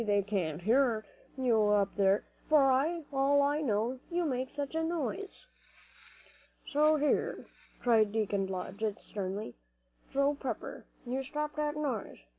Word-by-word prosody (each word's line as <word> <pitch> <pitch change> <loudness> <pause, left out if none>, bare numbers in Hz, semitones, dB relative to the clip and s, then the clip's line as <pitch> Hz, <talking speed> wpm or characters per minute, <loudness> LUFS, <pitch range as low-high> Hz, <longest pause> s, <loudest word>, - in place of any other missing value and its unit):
They 205 -2 +2
can 185 -7 -1
hear 225 - +2 0.3
you 240 -4 +3
up 205 -1 +2
there, 195 0 +3 0.3
for 285 -3 +6 0.4
all 280 +1 +4
I 290 +2 +1
know, 235 0 0
you 350 0 0
make 260 -3 -1
such 285 0 -4
a 320 0 0
noise." 340 - -3 1.2
"See 290 - -2 0.2
here," 295 0 0 0.3
cried 220 -4 +3
Deacon 205 -3 0
Blodgett, 200 +3 -3
sternly, 195 - -5 0.6
"Joe 280 +1 +2
Pepper, 265 -5 -5 0.2
you 255 +2 -2
stop 300 +2 -4
that 300 0 0
noise! 270 -8 -3
250 Hz, 130 wpm, -31 LUFS, 205-285 Hz, 1.2 s, for